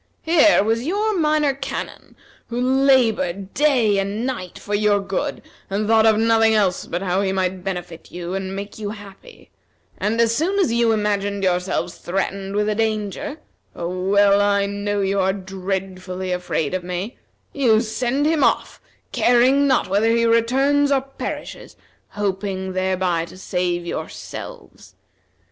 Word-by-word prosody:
Here 320 - +5
was 225 +2 0
your 420 +4 0
Minor 300 -2 +2
Canon, 270 0 -6 0.3
who 240 +1 -4
labored 245 -8 +2
day 245 -9 +3
and 200 +4 -2
night 185 -9 -4
for 205 - -6
your 205 0 +3
good, 195 -1 -3 0.3
and 200 +2 -1
thought 220 0 +4
of 220 -1 +4
nothing 225 0 +4
else 195 -4 +1
but 175 +3 -3
how 185 +1 0
he 195 -1 0
might 185 -1 -1
benefit 180 -3 -6
you 175 0 -5
and 190 0 -4
make 200 +2 -7
you 210 -1 -4
happy; 205 -2 -12 0.5
and 220 +2 -1
as 230 0 +3
soon 355 +8 0
as 365 -12 +2
you 235 -1 +3
imagine 205 -2 -1
yourselves 180 -1 -1
threatened 195 +2 -3
with 210 0 +1
a 215 - +1
danger, 220 +7 -2 0.4
for 170 0 -4
well 200 +2 +3
I 200 0 +2
know 205 0 -2
you 195 0 0
are 190 0 +2
dreadfully 190 -1 -4
afraid 180 -4 -2
of 185 -1 -2
me, 180 +6 -5 0.4
you 240 -6 +3
send 245 +5 -1
him 315 -1 +2
off, - - 0 0.3
caring 255 +4 +4
not 260 -6 +2
whether 205 +4 +2
he 230 0 +3
returns 270 +5 +3
or 275 -1 +3
perishes, 270 0 -7 0.3
hoping 190 -2 -3
thereby 185 -2 0
to 170 - -13
save 180 -2 -2
yourselves. 160 -2 -8
205 Hz, 155 wpm, -21 LUFS, 190-235 Hz, 0.5 s, Here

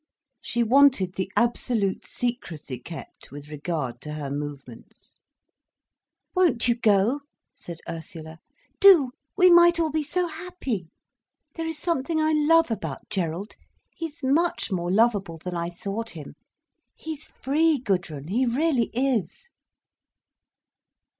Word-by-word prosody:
She 240 0 0
wanted 250 -6 +4
the 190 +1 -3
absolute 235 -4 0
secrecy 170 - -4
kept, 165 +5 -10
with 145 +1 -10
regard 150 -5 -4
to 150 - -6
her 145 -3 -5
movements. 145 - -8 1.2
"Won't 345 -11 +3
you 240 - +4
go?" 225 +2 +2 0.3
said 170 -2 -10
Ursula. 160 0 -8 0.4
"Do, 350 -10 +7 0.3
we 365 -2 +7
might 345 0 +7
all 320 -2 +1
be 310 +1 0
so 350 +5 -1
happy! 310 - -5 0.7
There 330 -1 -4
is 325 -1 -4
something 325 -1 -1
I 310 0 +2
love 315 -1 +4
about 160 -10 -5
Gerald—he's 205 - -6
much 295 -1 +1
more 175 -1 -1
lovable 200 -5 +2
than 180 +2 -6
I 170 0 -2
thought 200 +6 -5
him. 155 -7 -9 0.6
He's 315 -2 -7
free, 310 +3 +1
Gudrun, 175 - -3
he 245 +6 +1
really 260 -1 +1
is." 255 - -1
230 Hz, 120 wpm, -25 LUFS, -, 1.2 s, Do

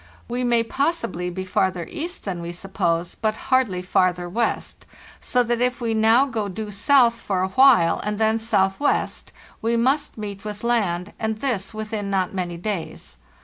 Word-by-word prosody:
We 245 +1 -2
may 240 -1 +3
possibly 230 - -1
be 185 +1 -5
farther 185 -2 0
east 340 +3 -6
than 180 -4 -4
we 170 +1 -5
suppose, 175 -2 -1
but 215 -1 -1
hardly 220 -9 +2
farther 180 -1 +1
west, 230 +7 -2 0.3
so 250 0 +1
that 240 0 -1
if 250 0 +1
we 230 -2 -1
now 225 +4 +5
go 225 -7 -3
due 210 +2 -5
south 235 +3 +4
for 185 -2 -1
a 190 - -1
while, 225 -7 +5
and 210 0 -2
then 220 +1 +2
southwest, 220 +4 0 0.3
we 230 +1 +1
must 270 +5 +1
meet 205 -1 -6
with 210 0 -6
land, 205 -6 0
and 220 -1 -1
this 225 -7 -1
within 215 -2 -4
not 190 -2 0
many 175 -2 -3
days. 175 - -5
215 Hz, 170 wpm, -23 LUFS, 185-235 Hz, 0.3 s, now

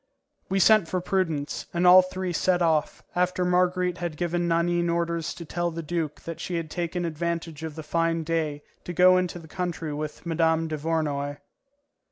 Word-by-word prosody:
We 195 +1 +1
sent 215 -2 +5
for 185 - -1
Prudence, 170 -6 -1
and 175 +1 +2
all 180 +1 +9
three 185 0 -4
set 180 +2 +2
off, 160 -3 +1
after 180 0 +1
Marguerite 180 0 +1
had 170 -3 -4
given 175 +1 -1
Nanine 170 +1 +1
orders 170 -1 -1
to 170 - -8
tell 175 +2 -1
the 165 0 -6
duke 160 -2 -3
that 165 -1 -7
she 180 - -4
had 165 -2 -3
taken 175 0 -2
advantage 165 -1 -3
of 160 -2 -5
the 160 - -6
fine 165 +1 0
day 155 -2 -2 0.2
to 175 - -5
go 185 +1 +6
into 180 -1 -1
the 165 -2 -11
country 170 -3 -3
with 150 +2 -6
Mme. 165 -1 +2
Duvernoy. 150 -2 -2
170 Hz, 180 wpm, -26 LUFS, 160-180 Hz, 0.2 s, all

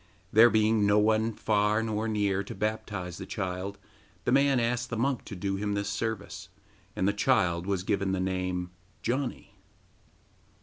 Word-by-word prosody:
There 115 +3 +8
being 110 -1 +3
no 100 +1 +4
one 110 +1 +3
far 105 0 +1
nor 110 0 -1
near 100 -3 0
to - - -7
baptize 105 -5 -3
the - - -7
child, 95 +1 -4 0.5
the - - 0
man 140 0 +4
asked 120 +1 0
the 115 - -3
monk 130 +1 0
to - - -7
do 95 +1 -2
him 105 0 -1
this 100 0 -2
service, 105 0 -4 0.5
and 95 - +1
the 100 - +2
child 90 -4 +1
was 95 -2 -1
given 100 -1 0
the 95 - 0
name 90 -1 -2
of 90 +2 -34
Janni. 125 +2 -2
105 Hz, 170 wpm, -28 LUFS, 95-110 Hz, 0.5 s, There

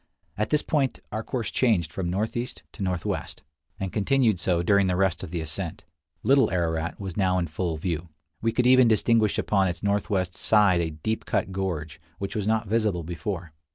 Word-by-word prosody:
At 105 - -1
this 150 - +2
point 140 -4 0
our 110 - -2
course 115 -1 -3
changed 95 -11 +2
from 90 -2 -2
northeast 110 +6 -3
to - - -11
northwest, 90 -3 -3 0.4
and 95 -1 -3
continued 115 -2 +2
so 85 -1 +1
during 100 +1 +4
the 90 - +1
rest 95 -2 +1
of - - -6
the 85 0 -3
ascent. 80 +2 -5 0.4
Little 135 0 +5
Ararat 85 -2 -1
was 95 -3 -5
now 95 -2 +2
in 90 - +1
full 80 +1 -3
view. 85 0 -3 0.3
We 115 - +1
could 125 +2 +1
even 130 -1 +7
distinguish 110 -1 +3
upon 95 -2 +2
its 85 0 -4
northwest 100 -3 0
side 100 -2 +4
a 80 - -1
deep 80 +9 -3
cut 95 - -1
gorge, 85 -6 -3 0.2
which 100 +4 -5
was 105 -2 -1
not 110 -1 +1
visible 105 -5 +1
before. 85 0 -5
95 Hz, 190 wpm, -26 LUFS, 85-110 Hz, 0.4 s, even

